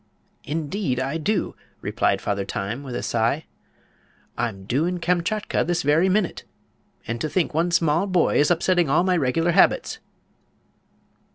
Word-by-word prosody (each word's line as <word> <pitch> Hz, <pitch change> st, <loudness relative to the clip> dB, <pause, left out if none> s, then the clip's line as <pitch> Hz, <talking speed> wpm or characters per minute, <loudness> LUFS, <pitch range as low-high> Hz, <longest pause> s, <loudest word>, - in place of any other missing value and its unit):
"Indeed 155 Hz, -2 st, -2 dB
I 135 Hz, +5 st, -2 dB
do," 185 Hz, +5 st, -1 dB, 0.2 s
replied -, -, 0 dB
Father 100 Hz, -1 st, -1 dB
Time, 100 Hz, +6 st, -4 dB
with 130 Hz, -4 st, -7 dB
a -, -, -3 dB
sigh. 120 Hz, +7 st, 0 dB, 0.9 s
"I'm 115 Hz, -5 st, -3 dB
due 130 Hz, +10 st, 0 dB
in 180 Hz, 0 st, -2 dB
Kamchatka 180 Hz, +5 st, 0 dB
this 175 Hz, +1 st, -1 dB
very 155 Hz, +6 st, +3 dB
minute. 190 Hz, -1 st, 0 dB, 0.6 s
And 115 Hz, +1 st, -4 dB
to 155 Hz, -, -1 dB
think 175 Hz, -2 st, 0 dB
one 165 Hz, +3 st, +1 dB
small 165 Hz, +2 st, +2 dB
boy 185 Hz, -3 st, +2 dB
is 145 Hz, -, +4 dB
upsetting 175 Hz, -1 st, +2 dB
all 155 Hz, +5 st, +3 dB
my 185 Hz, -1 st, +2 dB
regular 165 Hz, +3 st, +1 dB
habits!" -, -, +3 dB
160 Hz, 150 wpm, -23 LUFS, 130-175 Hz, 0.9 s, is